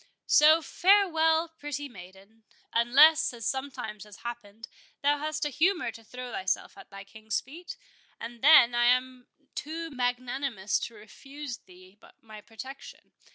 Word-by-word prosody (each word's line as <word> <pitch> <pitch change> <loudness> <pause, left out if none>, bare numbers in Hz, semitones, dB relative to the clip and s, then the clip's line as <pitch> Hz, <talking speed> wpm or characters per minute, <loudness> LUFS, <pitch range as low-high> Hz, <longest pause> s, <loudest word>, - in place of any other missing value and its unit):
So, 310 +2 +5
farewell, 335 -5 +3
pretty 290 -1 -5
maiden! 195 0 -15 0.3
unless, 290 +7 +5
as 230 -2 -8
sometimes 255 -5 -4
has 210 -1 -14
happened, 225 -2 -8 0.4
thou 290 +1 +2
hast 305 0 -3
a - - -1
humour 345 +6 +1
to 225 - -14
throw 250 +2 -9
thyself 190 -3 -3
at - - -14
thy 195 0 -10
King's 220 +1 -4
feet, 345 - -11 0.4
and 235 0 -9
then 275 -5 +7
I 240 0 +2
am 255 0 +1 0.3
too 325 +2 -6
magnanimous 245 -4 -2
to 235 - -16
refuse 270 +5 -9
thee 185 +2 -19 0.2
my 215 -1 -13
protection. 235 +6 -11
250 Hz, 140 wpm, -28 LUFS, 220-295 Hz, 0.4 s, then